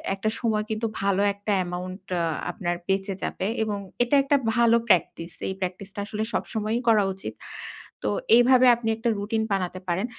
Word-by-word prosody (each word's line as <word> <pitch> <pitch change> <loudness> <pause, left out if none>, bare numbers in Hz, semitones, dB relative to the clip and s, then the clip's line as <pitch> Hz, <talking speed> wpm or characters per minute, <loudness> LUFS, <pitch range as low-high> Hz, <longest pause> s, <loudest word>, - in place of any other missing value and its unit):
একটা 205 +2 -1
সময় 220 -3 +1
কিন্তু 220 +1 -1
ভালো 195 0 +2
একটা 200 +1 -4
অ্যামাউন্ট 180 +1 -4 0.2
আ - - +1 0.3
আপনার 175 -4 -2
বেঁচে 195 0 0
যাবে 190 - -2 0.2
এবং 210 -2 -2 0.3
এটা 245 +4 +1
একটা 275 +1 +2 0.2
ভালো 235 -1 +5
প্র্যাকটিস। 170 -3 +1 0.2
এই 190 - -2
প্র্যাকটিসটা 190 +2 -5
আসলে 210 +1 -3
সবসময়ই 220 +2 -1
করা 220 -3 +5
উচিত। 190 - -7 0.7
তো - - +1 0.3
এইভাবে 250 +1 +6
আপনি 230 -1 -3
একটা 230 +1 0
রুটিন 220 +2 -1
বানাতে 185 -1 -2
পারেন 180 +4 0
205 Hz, 165 wpm, -25 LUFS, 190-225 Hz, 0.7 s, এইভাবে